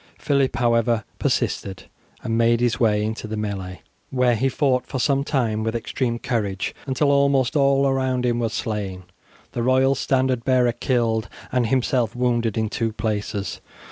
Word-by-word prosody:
Phillip, 140 -3 +1
however, 115 -1 +2 0.2
persisted, 95 -2 -1 0.4
and 115 - -1
made 115 0 +3
his 120 0 +1
way 105 -3 +2
into 110 +1 -3
the 110 0 -4
melee, 95 -3 -4 0.3
where 125 -2 +2
he 130 +5 +1
fought 130 -2 +1
for - - -4
some 140 +2 +1
time 115 -7 0
with 110 +1 -2
extreme 120 +1 -2
courage, 105 -6 -2
until 140 +2 +2
almost 140 -1 +2
all 140 -1 +3
around 130 -2 0
him 120 -1 +1
were 115 -1 0
slain, 105 -4 -4 0.5
the 120 - -3
royal 130 +2 +3
standard 130 -2 0
bearer 125 -2 +3
killed, 115 -3 0 0.2
and 125 -2 +1
himself 120 -2 +1
wounded 120 -3 0
in 110 -1 +1
two 115 +1 -2
places. 105 -1 -3
120 Hz, 160 wpm, -23 LUFS, 110-130 Hz, 0.5 s, made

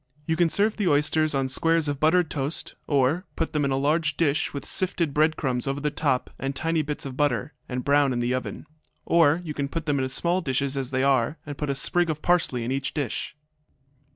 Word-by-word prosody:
You 160 - 0
can 170 0 +3
serve 210 +5 +1
the 205 -4 0
oysters 155 0 +2
on 135 -1 +1
squares 165 +4 +1
of 145 -1 -2
buttered 160 +2 +3
toast, 145 +2 -2
or 145 +6 +1
put 165 - -2
them 150 -1 +1
in 140 - +1
a 135 - +1
large 155 +3 +1
dish, 160 -1 +1
with 140 - -6
sifted 175 -5 0
bread 155 +2 +2
crumbs 130 -3 -1
over 135 +1 -1
the 150 +1 -1
top 130 -3 0
and 135 0 -3
tiny 165 +2 0
bits 150 -1 -4
of 135 -2 -6
butter, 145 0 0 0.2
and 125 -1 -3
brown 145 -1 +4
in 120 - -1
the 120 +1 0
oven. 130 +4 -4 0.4
Or 165 -1 +4
you 155 -3 -5
can 140 -1 -2
put 165 +1 -4
them 145 -3 +1
in 130 0 -1
small 175 +7 +1
dishes 135 -2 -1
as 135 -2 -2
they 130 0 0
are, 135 +2 +2
and 145 -1 -6
put 145 0 -3
a 140 - 0
sprig 175 +5 +1
of 155 -1 -3
parsley 165 -9 +2
in 120 - -3
each 135 0 -2
dish. 145 -1 -3
145 Hz, 230 wpm, -25 LUFS, 135-160 Hz, 0.4 s, brown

